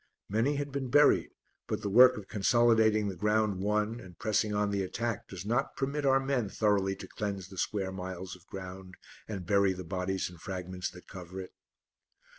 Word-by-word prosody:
Many 115 +8 +1
had 145 0 -3
been 135 -2 -3
buried, 145 +3 +5 0.4
but - - -3
the - - -1
work 125 +4 +8
of 100 -2 -8
consolidating 110 0 +3
the 95 - -3
ground 105 +1 +1
won 105 +3 0
and 90 -5 -12
pressing 105 +1 +1
on 105 0 +1
the 100 -1 0
attack 115 +4 -3
does 95 -1 -8
not 120 +6 0
permit 140 +1 -1
our 135 0 +5
men 135 -6 -1
thoroughly 100 -2 +1
to 95 - -9
cleanse 100 -3 -4
the 95 - -11
square 95 -3 -1
miles 95 0 -6
of 90 +1 -20
ground 95 0 -8 0.3
and 100 -5 -5
bury 100 0 +3
the 95 0 -7
bodies 95 +2 -2
and 90 -2 -12
fragments 90 -2 -4
that 90 - -14
cover 90 0 -8
it. 95 - -8
100 Hz, 190 wpm, -30 LUFS, 95-115 Hz, 0.4 s, work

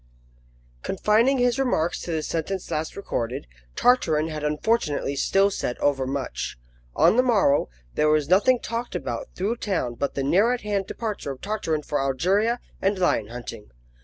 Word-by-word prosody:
CONFINING 220 - +2
his 245 +1 +2
remarks 210 -11 0
to 175 - -5
the 160 -1 -1
sentence 175 +4 -3
last 155 +1 -2
recorded, 125 - -3 0.3
Tartarin 160 -11 +3
had 155 -1 -5
unfortunately 150 -2 0
still 195 +8 +3
said 125 -9 -3
overmuch. 135 -1 -1 0.4
On 225 - +4
the - - +7
morrow, 205 - +3 0.2
there 150 - +2
was 150 -2 +2
nothing 205 +9 +4
talked 235 +1 -4
about - - -4
through 210 +6 -1
town 180 - -1
but 140 +4 -3
the 135 - -1
near 200 - +3
at 250 - -3
hand 205 -2 -2
departure 215 -9 -4
of 135 -2 -6
Tartarin 195 -8 -2
for 145 0 -1
Algeria 190 - +1 0.2
and 195 +1 +1
lion 145 - +1
hunting. 115 -2 -8
180 Hz, 160 wpm, -24 LUFS, 145-220 Hz, 0.4 s, the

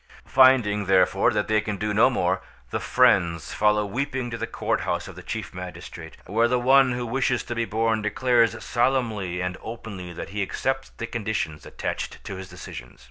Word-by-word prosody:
Finding, 125 -7 +4
therefore, 95 0 +4
that 105 -1 0
they 110 0 +3
can 105 -1 -4
do 105 +1 -1
no 110 +5 +5
more, 95 -7 0 0.3
the - - -1
friends 90 -10 +2
follow 105 0 +2
weeping 130 +3 -3
to 115 - -3
the - - -2
courthouse - - -2
of - - -10
the - - -9
chief - - -5
magistrate, 90 -2 -8
where 115 +4 +2
the 125 +1 +2
one 130 +1 +5
who 120 0 -3
wishes 125 +1 0
to 120 - -5
be 115 0 -1
born 110 0 0
declares 115 +1 +2
solemnly 115 -8 0
and 90 0 -3
openly 105 -6 -7
that 85 - -7
he 105 +1 -3
accepts 135 +7 -2
the 115 - -6
conditions 105 -10 -3
attached - - -4
to 95 - -6
his 95 0 -8
decision. 60 +1 -10
110 Hz, 185 wpm, -25 LUFS, 95-120 Hz, 0.3 s, no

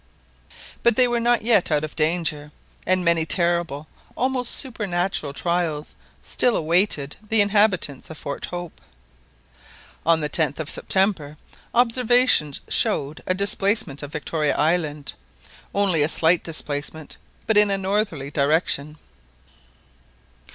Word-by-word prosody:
But 235 - +4
they 255 +1 +5
were 240 -1 0
not 235 -1 +1
yet 225 -5 +3
out 150 -2 +1
of 155 - -6
danger, 155 -2 -1 0.4
and 185 -1 +2
many 170 -1 +3
terrible, 170 -3 0 0.3
almost 255 -1 0
supernatural, 190 - -2
trials 165 -1 -2 0.3
still 245 - +2
awaited 160 -3 +1
the 225 - +2
inhabitants 205 -8 +2
of 160 - -9
Fort 140 -1 -5
Hope. 175 -2 -8 1.2
On 165 0 +3
the 150 - -1
10th 150 -2 0
of 155 -1 -3
September 185 -7 0 0.4
observations 245 - +3
showed 145 +3 0
a 185 - +1
displacement 200 -5 -1
of 145 0 -8
Victoria 150 0 -1
Island. 150 -2 -1 0.6
Only 195 -6 +1
a 145 - +2
slight 165 +1 +2
displacement, 150 -1 -4 0.3
but 220 - +1
in 210 0 +5
a 195 - 0
northerly 195 -8 -2
direction. 150 0 0
170 Hz, 125 wpm, -22 LUFS, 150-205 Hz, 1.2 s, they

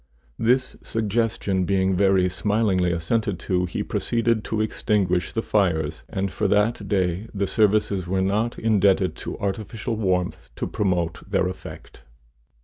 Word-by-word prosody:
This 125 +3 +2
suggestion 110 -3 0
being 95 0 +1
very 95 -1 +3
smilingly 95 0 +1
assented 90 +4 -1
to, 90 -1 0
he - - -3
proceeded 115 -2 0
to 110 - -2
extinguish 100 -4 0
the 115 - -2
fires, 80 -7 0
and 95 -1 -2
for 105 - 0
that 105 +1 +1
day 95 +1 0
the 100 0 +1
services 105 -3 +2
were 95 +1 0
not 105 +5 0
indebted 100 -4 +2
to - - -6
artificial 105 +3 -3
warmth 90 -4 -1
to - - -3
promote 90 -4 -1
their - - +2
effect. 90 - -9
100 Hz, 140 wpm, -24 LUFS, 90-110 Hz, -, very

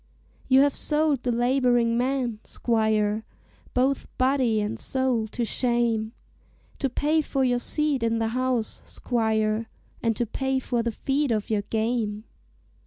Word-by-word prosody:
"You 265 0 +6
have 285 0 +3
sold 300 -3 +1
the 250 - -1
laboring 245 -1 +2
man, 245 -2 -1
squire, 220 -2 0 0.5
Both 260 +2 +1
body 255 -4 +2
and 210 +1 -3
soul 260 -4 0
to 235 +2 -3
shame, 235 -2 0 0.7
To 270 - 0
pay 305 +5 +1
for 275 -2 -1
your 245 -1 +2
seat 300 0 0
in 230 0 +1
the 225 0 0
House, 250 -1 -1
squire, 220 -2 -1 0.3
And 225 -1 +1
to 240 - 0
pay 265 +4 -1
for 245 -2 -1
the 235 0 -1
feed 275 +5 -1
of 215 -1 -1
your 210 -2 +2
game. 220 0 -2
240 Hz, 145 wpm, -25 LUFS, 225-265 Hz, 0.7 s, You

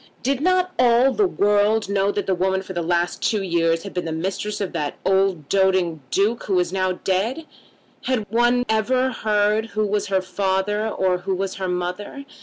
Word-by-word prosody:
Did 275 +2 0
not 365 +2 +2
all 250 +2 +4
the 410 - +2
world 210 - +2
know 200 0 +1
that 205 - -3
the 190 - +1
woman 190 +1 0
for 190 - -8
the 175 - -2
last 175 0 -1
two 210 -3 0
years 165 -2 +1
had 200 - -8
been 180 - -3
the 165 - -3
mistress 190 +6 -3
of 200 -3 -3
that 145 -1 -3
old 190 -6 +1
doting 190 -4 +1
Duke 215 - 0
who 195 - 0
was 180 0 +1
now 185 -1 0
dead? 205 - -2 0.6
Had 250 -5 0
one 240 +2 +2
ever 255 +4 +1
heard 215 -1 +1
who 215 - +2
was 205 0 -1
her 190 -1 0
father 195 +3 -1
or 185 -3 0
who 190 +1 -2
was 195 0 -3
her 190 -1 -3
mother? 180 +10 -4
195 Hz, 195 wpm, -22 LUFS, 185-220 Hz, 0.6 s, all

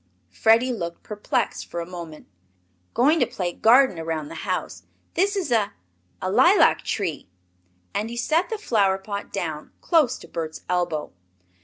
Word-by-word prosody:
Freddie 230 +3 +3
looked 170 -6 -5
perplexed 210 -1 -2
for 170 - -5
a 170 - -3
moment. 170 -3 -9 0.7
"Going 295 +7 +4
to - - +3
play 175 -2 -3
garden 240 -3 +5
around 160 -2 -3
the - - -8 0.2
house. - - -2 0.3
This 400 +4 +1
is 365 -9 -2
a 215 -4 +2 0.5
a 185 - -2
lilac 265 - +5
tree!" 170 - -3 0.6
And 215 +2 -2
he 235 - -6
set 320 +9 +1
the 445 - -2
flower 205 - +2
pot 200 +1 -6
down 160 -6 -4
close 305 -8 +2
to - - -13
Bert's 160 -1 -5
elbow. 175 -4 -1
205 Hz, 155 wpm, -24 LUFS, 170-255 Hz, 0.7 s, garden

